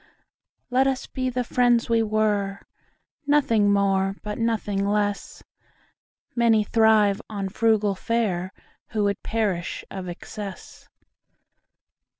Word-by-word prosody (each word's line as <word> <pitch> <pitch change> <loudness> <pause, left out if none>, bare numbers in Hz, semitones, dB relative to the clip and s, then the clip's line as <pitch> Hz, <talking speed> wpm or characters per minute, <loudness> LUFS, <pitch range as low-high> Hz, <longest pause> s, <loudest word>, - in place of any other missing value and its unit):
Let 260 +2 +3
us 265 -1 -1
be 255 -1 -3
the 250 0 -1
friends 240 -1 +2
we 230 -1 +2
were, 210 -2 0 0.7
Nothing 230 -8 +3
more 195 -1 +2
but 210 +1 -5
nothing 215 -3 0
less:Many 210 +2 -2
thrive 215 -1 +3
on 200 -3 -3
frugal 215 -1 +2
fareWho 190 -3 -1 0.5
would 200 -1 0
perish 205 -6 -2
of 185 -2 -6
excess. 195 +2 -9
210 Hz, 100 wpm, -24 LUFS, 200-230 Hz, 0.7 s, Let